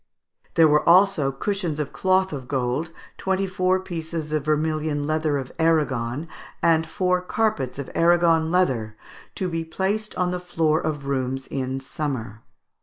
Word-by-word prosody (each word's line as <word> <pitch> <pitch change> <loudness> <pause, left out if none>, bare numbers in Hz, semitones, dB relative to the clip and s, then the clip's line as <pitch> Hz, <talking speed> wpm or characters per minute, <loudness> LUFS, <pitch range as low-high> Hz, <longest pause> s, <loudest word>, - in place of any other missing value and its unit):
There 165 -1 +7
were 150 0 +4
also 180 -6 +5
cushions 170 +1 -2
of 150 - -3
cloth 190 -1 +2
of 130 -3 -6
gold, 130 +4 -1 0.3
twenty 190 0 0
four 185 0 +1
pieces 165 -3 -5
of 155 -2 0
vermilion 155 -1 0
leather 155 -1 0
of 130 -2 -5
Aragon, 150 -4 +1 0.4
and 160 -1 +3
four 180 +2 +1
carpets 180 - -1
of 140 - -5
Aragon 165 -1 +3
leather, 125 -12 +1 0.4
"to 185 - -2
be 165 -2 -2
placed 195 +6 -2
on 180 -1 0
the 180 - -2
floor 165 -3 +1
of 150 -3 -3
rooms 135 -1 -2
in 130 0 -3
summer." 130 -6 -4
160 Hz, 150 wpm, -24 LUFS, 140-180 Hz, 0.4 s, There